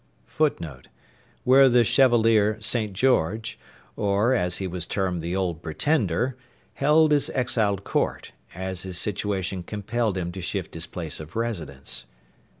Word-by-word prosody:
[Footnote: 80 Hz, -, -2 dB, 0.6 s
Where 135 Hz, +1 st, +6 dB
the 120 Hz, -1 st, +5 dB
Chevalier 115 Hz, -4 st, +4 dB
St. 110 Hz, -1 st, -1 dB
George, 110 Hz, -2 st, +1 dB, 0.4 s
or, 105 Hz, +5 st, +2 dB
as 90 Hz, -7 st, 0 dB
he 95 Hz, -, -2 dB
was 90 Hz, -1 st, -2 dB
termed, 95 Hz, -4 st, -1 dB
the 85 Hz, +3 st, -3 dB
Old 90 Hz, -4 st, -2 dB
Pretender, 120 Hz, -, 0 dB, 0.4 s
held 150 Hz, +2 st, +4 dB
his 145 Hz, -1 st, +3 dB
exiled 110 Hz, -6 st, +1 dB
court, -, -, -2 dB, 0.2 s
as 95 Hz, 0 st, -4 dB
his 95 Hz, -1 st, -4 dB
situation 95 Hz, -2 st, -2 dB
compelled 105 Hz, +2 st, -2 dB
him 85 Hz, -1 st, -3 dB
to 95 Hz, +1 st, -7 dB
shift 90 Hz, -1 st, -4 dB
his 80 Hz, +1 st, -5 dB
place 80 Hz, -4 st, -4 dB
of 80 Hz, 0 st, -10 dB
residence. 85 Hz, -, -3 dB
100 Hz, 140 wpm, -25 LUFS, 90-120 Hz, 0.6 s, Where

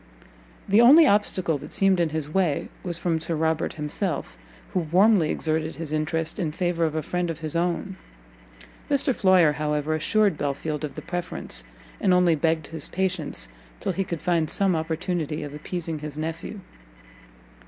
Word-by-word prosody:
The 205 Hz, +3 st, +5 dB
only 295 Hz, +7 st, +8 dB
obstacle 185 Hz, -, +2 dB
that 140 Hz, -, -10 dB
seemed 195 Hz, -2 st, +3 dB
in 170 Hz, -2 st, +2 dB
his 155 Hz, -1 st, -3 dB
way 165 Hz, -2 st, 0 dB
was 175 Hz, -2 st, -3 dB
from 165 Hz, -2 st, -1 dB
Sir 165 Hz, 0 st, +3 dB
Robert 160 Hz, 0 st, 0 dB
himself, 150 Hz, +2 st, -3 dB, 0.4 s
who 185 Hz, -, +2 dB
warmly 180 Hz, +1 st, +4 dB
exerted 160 Hz, 0 st, -1 dB
his 160 Hz, -2 st, -5 dB
interest 160 Hz, +4 st, -1 dB
in 165 Hz, -5 st, -1 dB
favour 170 Hz, 0 st, 0 dB
of 155 Hz, -1 st, -2 dB
a 155 Hz, -, -1 dB
friend 180 Hz, +2 st, -2 dB
of 165 Hz, -1 st, -5 dB
his 155 Hz, 0 st, -3 dB
own. 175 Hz, +3 st, -1 dB, 0.9 s
Mr 280 Hz, -1 st, +2 dB
Floyer, 185 Hz, -7 st, +5 dB
however, 150 Hz, +1 st, -1 dB
assured 195 Hz, +2 st, +2 dB
Belfield 145 Hz, +2 st, -2 dB
of 150 Hz, -, -5 dB
the -, -, -7 dB
preference, 175 Hz, -1 st, -4 dB, 0.4 s
and 190 Hz, -4 st, +3 dB
only 180 Hz, -2 st, +4 dB
begged 160 Hz, 0 st, +1 dB
his 160 Hz, 0 st, -5 dB
patience 180 Hz, -, -1 dB, 0.3 s
till -, -, -1 dB
he 190 Hz, +2 st, -1 dB
could 170 Hz, -4 st, -5 dB
find 170 Hz, -3 st, +1 dB
some 195 Hz, -3 st, +2 dB
opportunity 160 Hz, -1 st, -2 dB
of 145 Hz, -1 st, -7 dB
appeasing 160 Hz, +1 st, -4 dB
his 150 Hz, -1 st, -7 dB
nephew. 165 Hz, +6 st, -5 dB
165 Hz, 165 wpm, -25 LUFS, 155-185 Hz, 0.9 s, only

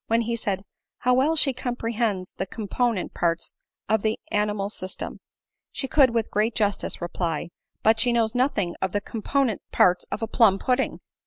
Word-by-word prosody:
When 230 Hz, +1 st, +3 dB
he 235 Hz, +1 st, -1 dB
said, 195 Hz, -4 st, -2 dB, 0.3 s
"How 250 Hz, -, +2 dB
well 275 Hz, +6 st, +3 dB
she 280 Hz, -3 st, +4 dB
comprehends 230 Hz, -6 st, -2 dB
the 190 Hz, -, -2 dB
component 225 Hz, +1 st, -1 dB
parts 170 Hz, -1 st, -1 dB, 0.3 s
of 220 Hz, 0 st, +2 dB
the 220 Hz, +1 st, 0 dB
animal 210 Hz, -1 st, 0 dB
system 185 Hz, -2 st, -5 dB, 0.3 s
!" -, -, -61 dB
She 270 Hz, -, -3 dB
could 270 Hz, -1 st, +5 dB
with 230 Hz, -2 st, -1 dB
great 215 Hz, +2 st, +1 dB
justice 205 Hz, -4 st, -1 dB
reply, 170 Hz, -2 st, -2 dB, 0.2 s
" -, -, -53 dB
but 225 Hz, +1 st, +4 dB
she 245 Hz, +1 st, +3 dB
knows 230 Hz, -1 st, +2 dB
nothing 245 Hz, -9 st, +1 dB
of 190 Hz, -1 st, -1 dB
the 205 Hz, -, 0 dB
component 230 Hz, +2 st, -1 dB
parts 180 Hz, 0 st, +4 dB
of -, -, -3 dB
a -, -, 0 dB
plum 220 Hz, -4 st, +4 dB
pudding." 255 Hz, +5 st, 0 dB
220 Hz, 180 wpm, -25 LUFS, 195-245 Hz, 0.3 s, could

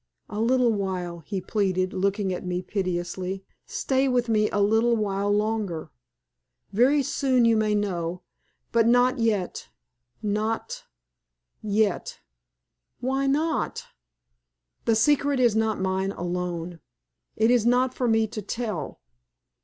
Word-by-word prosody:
"A 210 Hz, 0 st, -3 dB
little 245 Hz, 0 st, +3 dB
while," 185 Hz, -4 st, -3 dB
he 190 Hz, +5 st, -4 dB
pleaded, 185 Hz, -1 st, 0 dB
looking 195 Hz, 0 st, 0 dB
at 180 Hz, -, -5 dB
me 180 Hz, 0 st, -2 dB
piteously. 185 Hz, 0 st, -3 dB, 0.2 s
"Stay 265 Hz, 0 st, 0 dB
with 245 Hz, -2 st, +1 dB
me 215 Hz, -1 st, +3 dB
a -, -, -2 dB
little 220 Hz, +4 st, +3 dB
while 200 Hz, -2 st, 0 dB
longer. 205 Hz, -7 st, -1 dB, 0.8 s
Very 265 Hz, +7 st, +4 dB
soon 255 Hz, -2 st, +2 dB
you 230 Hz, -1 st, +4 dB
may 215 Hz, -1 st, +2 dB
know, 180 Hz, -4 st, -2 dB, 0.5 s
but 230 Hz, -1 st, +3 dB
not 245 Hz, +2 st, +4 dB
yet 210 Hz, -5 st, -1 dB, 0.5 s
not 220 Hz, -, -2 dB, 0.8 s
yet 210 Hz, -2 st, 0 dB, 0.4 s
" -, -, -56 dB
"Why 270 Hz, +1 st, 0 dB
not?" 310 Hz, +4 st, 0 dB, 1.0 s
"The 225 Hz, -, +3 dB
secret 280 Hz, +3 st, +3 dB
is 240 Hz, -4 st, +4 dB
not 220 Hz, -1 st, +1 dB
mine 190 Hz, +1 st, -1 dB
alone. 175 Hz, -1 st, -4 dB, 0.6 s
It 225 Hz, +2 st, +3 dB
is 240 Hz, -2 st, +3 dB
not 250 Hz, +1 st, +3 dB
for 250 Hz, -, -1 dB
me 225 Hz, -1 st, +3 dB
to 215 Hz, 0 st, -6 dB
tell. 205 Hz, -, -4 dB
215 Hz, 130 wpm, -25 LUFS, 185-240 Hz, 1.0 s, Very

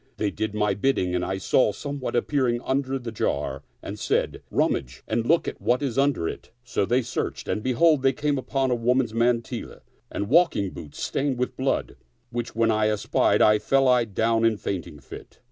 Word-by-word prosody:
They 105 Hz, -2 st, 0 dB
did 110 Hz, -1 st, -3 dB
my 105 Hz, -1 st, +1 dB
bid 135 Hz, +8 st, +1 dB
ding 90 Hz, -1 st, -1 dB
and 90 Hz, 0 st, 0 dB
I 95 Hz, +1 st, -2 dB
saw 105 Hz, +4 st, +2 dB
somewhat 140 Hz, +4 st, -5 dB
appearing 120 Hz, -1 st, +1 dB
under 135 Hz, 0 st, -1 dB
the 120 Hz, -3 st, -6 dB
jar 70 Hz, -10 st, -2 dB, 0.2 s
and -, -, -6 dB
said, -, -, -1 dB
" -, -, -39 dB
Rummage 65 Hz, 0 st, -1 dB
and 115 Hz, +1 st, -1 dB
look 165 Hz, +1 st, +3 dB
at -, -, -5 dB
what 125 Hz, +4 st, +1 dB
is 135 Hz, -5 st, -2 dB
under 140 Hz, -12 st, +2 dB
it." -, -, -7 dB
So 120 Hz, -4 st, -1 dB
they 125 Hz, +1 st, +2 dB
searched, -, -, -4 dB
and 105 Hz, -, -1 dB
behold, 130 Hz, +5 st, +3 dB
they 135 Hz, 0 st, +4 dB
came 145 Hz, +1 st, -1 dB
upon 135 Hz, 0 st, -1 dB
a -, -, +3 dB
woman's 120 Hz, 0 st, +1 dB
mantilla 115 Hz, 0 st, -1 dB, 0.3 s
and 100 Hz, -, -3 dB
walk 170 Hz, +8 st, +4 dB
ing 100 Hz, -2 st, -1 dB
boots 75 Hz, -, -10 dB
stained 135 Hz, -2 st, -1 dB
with 125 Hz, +1 st, -2 dB
blood, 130 Hz, +1 st, -1 dB, 0.3 s
which 120 Hz, -2 st, -4 dB
when 115 Hz, 0 st, +3 dB
I 110 Hz, 0 st, +2 dB
espied, 105 Hz, -1 st, +2 dB
I 105 Hz, 0 st, +5 dB
fell 130 Hz, -2 st, +3 dB
down 115 Hz, +2 st, +1 dB
in 115 Hz, -1 st, +4 dB
a -, -, -10 dB
fainting 90 Hz, -7 st, -5 dB
fit. 70 Hz, -, -12 dB
120 Hz, 205 wpm, -25 LUFS, 105-135 Hz, 0.3 s, I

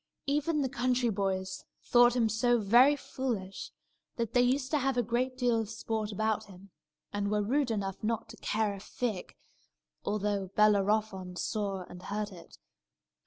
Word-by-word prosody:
Even 295 Hz, +1 st, +1 dB
the -, -, +1 dB
country 250 Hz, -1 st, +1 dB
boys 190 Hz, -2 st, -2 dB, 0.2 s
thought 240 Hz, 0 st, +5 dB
him 235 Hz, -3 st, +3 dB
so 240 Hz, +3 st, +2 dB
very 240 Hz, +7 st, +6 dB
foolish 235 Hz, -9 st, -4 dB, 0.5 s
that 230 Hz, -3 st, -2 dB
they 245 Hz, -, +5 dB
used 255 Hz, +2 st, +1 dB
to 300 Hz, -, +2 dB
have 270 Hz, -1 st, 0 dB
a 245 Hz, -, +3 dB
great 250 Hz, +3 st, -1 dB
deal 245 Hz, -3 st, +2 dB
of 220 Hz, -2 st, -3 dB
sport 220 Hz, -1 st, -3 dB
about 215 Hz, +1 st, 0 dB
him, 195 Hz, 0 st, -15 dB, 0.4 s
and 205 Hz, 0 st, -1 dB
were 210 Hz, 0 st, +1 dB
rude 265 Hz, +5 st, +1 dB
enough 200 Hz, -3 st, -3 dB
not 225 Hz, +1 st, -1 dB
to 225 Hz, -, -11 dB
care 215 Hz, -1 st, 0 dB
a 200 Hz, -, -8 dB
fig, 210 Hz, -1 st, -4 dB, 0.7 s
although 205 Hz, -1 st, -1 dB
Bellerophon 205 Hz, -3 st, +2 dB
saw 200 Hz, -1 st, -2 dB
and 180 Hz, 0 st, -11 dB
heard 210 Hz, +2 st, -3 dB
it. 175 Hz, -3 st, -13 dB
220 Hz, 165 wpm, -31 LUFS, 200-245 Hz, 0.7 s, very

